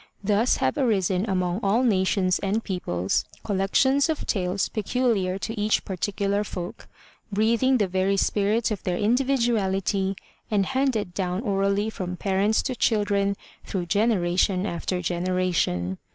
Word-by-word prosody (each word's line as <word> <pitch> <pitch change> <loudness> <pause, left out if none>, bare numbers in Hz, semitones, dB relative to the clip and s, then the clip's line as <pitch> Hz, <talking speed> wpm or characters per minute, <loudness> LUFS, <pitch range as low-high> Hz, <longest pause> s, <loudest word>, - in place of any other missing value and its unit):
Thus 210 +4 +2
have 130 0 0
arisen 200 -4 +1
among 185 0 0
all 210 +6 +2
nations 190 -4 +2
and 205 +3 -1
peoples 95 - -1 0.2
col 200 -3 -2
lections 265 +9 +3
of 315 - -2
tales 190 -1 0
peculiar 215 -4 0
to 220 +2 -4
each 215 +1 +1
particular 200 +2 -1
folk, 180 -4 -7 0.4
breathing 230 +5 +2
the 205 -4 +1
very 190 +2 +1
spirit 210 +4 +1
of 210 - -3
their 180 -1 -2
individuality 215 -5 +1 0.3
and 205 -3 +2
handed 260 -8 0
down 185 0 -2
orally 200 0 0
from 180 -3 -5
parents 200 +3 +1
to 255 - -2
children 205 -3 +1 0.3
through 185 -3 -3
generation 185 -1 +1
after 180 -1 -3
generation. 175 - -1
200 Hz, 135 wpm, -25 LUFS, 185-220 Hz, 0.4 s, lections